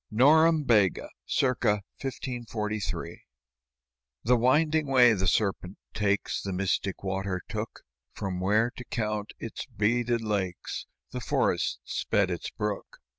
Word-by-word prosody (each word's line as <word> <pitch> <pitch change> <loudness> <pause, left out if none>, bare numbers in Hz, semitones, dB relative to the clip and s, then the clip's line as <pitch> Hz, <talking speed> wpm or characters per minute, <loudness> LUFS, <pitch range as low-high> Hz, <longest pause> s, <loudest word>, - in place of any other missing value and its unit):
NOREMBEGA 140 - +4 0.2
[c. - - +2
1543] 115 -2 -2 1.0
The 125 +3 +4
winding 150 +5 +3
way 125 -3 +6
the 95 -2 0
serpent 95 -1 0 0.2
takes 100 -1 0
The 100 - -4
mystic 95 +1 -1
water 95 -1 -2
took, - - -5 0.3
From 95 -2 -4
where, 105 +6 +2
to 125 - -6
count 105 -2 -3
its - - -6
beaded 120 +2 +1
lakes, 100 -5 -3 0.2
The - - -4
forest - - 0
sped 100 -3 0
its 85 - -4
brook. 105 -2 -4
105 Hz, 115 wpm, -28 LUFS, 100-125 Hz, 1.0 s, way